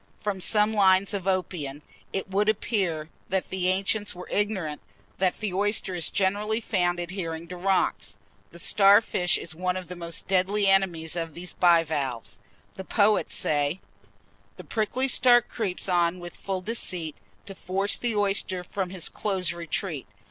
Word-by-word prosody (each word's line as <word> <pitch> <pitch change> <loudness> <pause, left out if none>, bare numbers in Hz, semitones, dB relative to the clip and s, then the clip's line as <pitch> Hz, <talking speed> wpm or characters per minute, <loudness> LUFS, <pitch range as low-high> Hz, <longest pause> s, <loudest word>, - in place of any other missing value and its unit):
From 200 -3 -3
some 210 +2 +3
lines 195 -1 +4
of 195 -2 -3
Oppian, 160 -7 -2 0.3
it 195 - -3
would 200 +2 +1
appear 185 -8 -1 0.2
that 190 0 -1
the 185 -1 0
ancients 200 +2 +1
were 180 - -9
ignorant 190 -8 -1 0.4
that 185 -1 +1
the 210 -4 -2
oyster 200 0 +1
is 175 -2 -1
generally 205 +3 0
found 180 -6 0
adhering 170 -2 -4
to 180 - -6
rocks. 190 +1 0 0.3
The - - -13
starfish 195 -1 +4
is 165 - -4
one 180 +2 -1
of 185 -2 -7
the 180 - -6
most 170 -1 -5
deadly 195 +2 +2
enemies 180 -5 +2
of 165 -3 -4
these 180 +1 -5
bivalves. 155 - +1 0.3
The 190 - -7
poet 210 +2 +2
says: 145 +1 0 0.8
The - - -9
prickly 240 +4 -1
star 250 -2 +6
creeps 215 -6 -4
on 175 -1 +2
with 175 0 -9
full 190 -2 -4
deceit 180 -6 -3 0.3
To 195 - -8
force 195 +2 0
the 240 -3 -2
oyster 195 -2 +1
from 185 0 -3
his 180 -3 +1
close 185 -4 -1
retreat. 170 - -4
185 Hz, 155 wpm, -26 LUFS, 175-205 Hz, 0.8 s, star